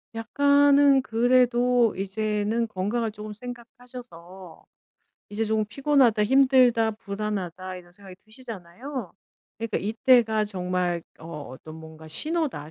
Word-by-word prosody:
약간은 285 +3 +4
그래도 245 0 +2
이제는 210 +3 -2
건강을 215 +3 -2
쪼금 210 0 -9
생각하셔서 235 -7 -12 0.7
이제 220 +2 -2
조금 215 0 0
'피곤하다, 255 -3 +2
힘들다, 255 -3 +4
불안하다.' 195 -3 -5
이런 175 -1 -14
생각이 190 -1 -14
드시잖아요. 225 0 -8 0.5
그러니까 230 0 -2
이때가 220 0 +2
정말 180 -3 -2 0.2
어 160 - -11 0.2
어떤 155 +5 -11
뭔가 160 0 -12
'신호다. 285 - -2
220 Hz, 290 characters per minute, -25 LUFS, 185-250 Hz, 0.7 s, 약간은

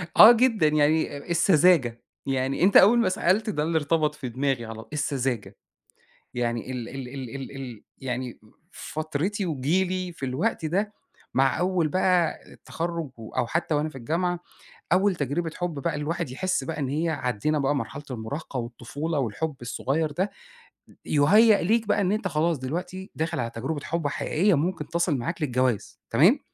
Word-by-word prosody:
آه 220 - +11
جدًا، 230 -8 +3
يعني 150 0 +2
آآ - - -7
السذاجة، 165 -7 +4 0.2
يعني 135 +2 0
أنت 195 +2 +7
أول 225 +5 +7
ما 230 - +3
سألت 190 +4 +1
ده 150 -8 -1
اللي 165 +1 +1
ارتبط 150 0 +1
في 135 -4 -6
دماغي 130 0 -1
على 110 0 -8
السذاجة، 135 -6 -2 0.8
يعني 120 0 -2
ال 120 -2 -5
ال 135 -1 -6
ال 130 -1 -7
ال 135 0 -7
ال 125 -5 -8
يعني 125 -1 -4 0.3
فترتي 160 +8 -3
وجيلي 180 +5 0
في 155 -5 -6
الوقت 130 +4 -1
ده 200 +6 -1 0.4
مع 135 -1 +2
أول 180 -2 +1
بقى 180 -1 +2
التخرج 165 -3 -4
و 110 -1 -9
أو - - +1
حتى 165 +3 0
وأنا 150 +1 0
في 155 - -16
الجامعة، 170 +7 -1 0.5
أول 195 0 +3
تجربة 160 +3 -2
حب 175 -1 -2
بقى 155 +2 -1
الواحد 160 +1 -2
يحس 185 +2 -1
بقى 160 +3 -4
إن 135 -3 -1
هي 155 +4 0
عدِّينا 150 0 -1
بقى 140 +1 +1
مرحلة 145 +1 -4
المراهقة 130 +5 -5
والطفولة 130 +6 -3
والحب 135 +5 -2
الصغير 140 +6 -1
ده، 185 +7 -1 0.7
يُهيئ 205 +9 +5
ليك 220 +4 +2
بقى 205 - +2
إن 185 -1 +1
أنت 210 -2 0
خلاص 165 -1 +1
دلوقتي 175 +8 -5
داخل 160 -1 -2
على 120 -1 -1
تجربة 135 +6 -4
حب 165 -2 -1
حقيقية 175 +7 +1
ممكن 155 0 -1
تصل 170 -3 +1
معاك 160 +8 -4
للجواز 125 -5 0
تمام؟ - - +5
155 Hz, 165 wpm, -26 LUFS, 130-175 Hz, 0.8 s, آه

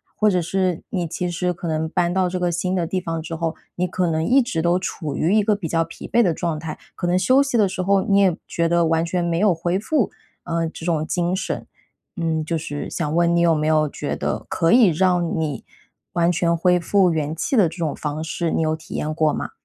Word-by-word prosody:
或 215 - +3
者 180 -3 +1
是 185 0 -1
你 175 -3 -2
其 180 +3 -3
实 180 +1 -1
可 175 +1 -9
能 160 0 -1
搬 175 +1 0
到 190 -1 +2
这 185 - -3
个 175 -1 0
新 180 +2 -1
的 175 -2 0
地 185 - -1
方 165 -2 -4
之 165 +1 -6
后， 165 0 -2 0.2
你 180 +1 0
可 180 0 -1
能 160 -1 0
一 265 +7 +5
直 180 -9 -2
都 175 +2 +2
处 160 -5 -4
于 170 +5 +1
一 215 - +5
个 210 0 +2
比 200 -5 -5
较 165 +1 +2
疲 165 - -10
惫 235 - +4
的 180 -7 +2
状 165 -1 -2
态。 155 0 -6 0.2
可 175 - -3
能 175 +1 +2
休 255 +9 +4
息 280 -3 -3
的 205 -3 +3
时 185 - -3
候 195 +1 +3
你 200 0 +3
也 190 -4 +4
觉 170 0 0
得 170 0 +2
完 165 +1 +1
全 175 +1 -1
没 170 -1 0
有 205 -1 +4
恢 175 +2 -1
复， 250 +1 0 0.3
呃， 165 0 -1
这 160 - -9
种 160 -3 0
精 175 0 0
神。 190 - -4 0.5
嗯， 160 -2 -1
就 165 +1 -1
是 145 -2 -5
想 155 -3 -2
问 170 0 +3
你 - - +3
有 170 -1 +4
没 150 0 -1
有 155 -1 +3
觉 - - -4
得 - - -3
可 165 - +1
以 240 -3 +7
让 175 0 +1
你 150 -6 -3 0.5
完 170 0 +2
全 170 -1 +1
恢 180 +2 +3
复 185 +1 +3
元 155 -2 -1
气 215 - -1
的 205 -7 +5
这 165 - -11
种 160 -4 -2
方 150 0 -4
式， 165 +1 -2
你 - - 0
有 155 0 +1
体 160 - -11
验 155 +1 -2
过 155 -1 +2
吗？ - - -4
170 Hz, 270 characters per minute, -22 LUFS, 160-185 Hz, 0.5 s, 以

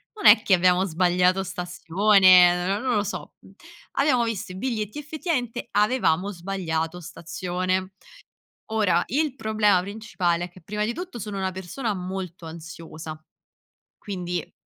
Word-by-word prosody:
non 415 - -7
è - - +9
che 195 - +2
abbiamo 180 +1 +4
sbagliato 180 +2 +2
stazione, 180 0 +4 0.2
n - - -7
non 255 -2 0
lo 205 - +2
so." 205 - -6 0.6
Abbiamo 275 -4 +3
visto 215 -5 -3
i - - -9
biglietti: 215 +3 -3
effettivamente 290 -6 -3
avevamo 205 -4 +2
sbagliato 175 -2 -3
stazione. 185 +3 -3 0.8
Ora 185 -6 +2
il 285 +1 -1
problema 215 -5 +2
principale 185 -4 -2
è - - -12
che, 185 - -16
prima 210 +5 -3
di 230 - -1
tutto, 345 -4 -7
sono 210 0 -5
una 190 -1 -1
persona 190 +5 -4
molto 185 -2 -6
ansiosa. 160 -1 -9 0.8
Quindi 180 -4 -5
190 Hz, 135 wpm, -24 LUFS, 180-215 Hz, 0.8 s, è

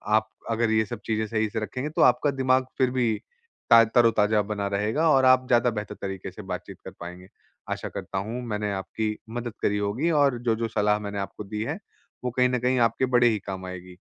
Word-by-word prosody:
आप 110 0 +1 0.2
अगर 115 0 +1
ये 110 0 +3
सब - - -6
चीज़ें 110 -1 0
सही 110 0 0
से 110 - -3
रखेंगे 130 +6 -4
तो 155 - -1
आपका 125 +4 +4
दिमाग 130 -1 +2
फिर 130 -2 +2
भी 125 -3 +1 0.6
ता 115 0 +9
तरोताज़ा 110 -2 +3
बना 100 -1 -1
रहेगा 110 +11 +1
और 135 -3 +5
आप 130 0 +5
ज़्यादा 120 0 +4
बेहतर 105 0 -5
तरीक़े 95 -2 -5
से - - -10
बातचीत - - -6
कर - - -7
पाएँगे। 90 +1 -9 0.4
आशा - - -3
करता 95 - -6
हूँ 120 +3 -4
मैंने 105 -2 -2
आपकी 105 +3 -3
मदद 120 0 -5
करी 105 - +1
होगी 105 +11 0
और 135 -3 +2
जो-जो 115 -1 0
सलाह 105 -1 +1
मैंने 100 -1 -5
आपको 100 +1 -5
दी 105 +1 -5
है, 150 - -4 0.4
वो 125 - -1
कहीं 125 +1 +2
न 125 0 0
कहीं 125 +1 +1
आपके 115 +3 -1
बड़े 120 0 +5
ही 110 -2 0
काम 95 -1 -5
आएगी। 90 0 -9
110 Hz, 215 wpm, -26 LUFS, 105-125 Hz, 0.6 s, ता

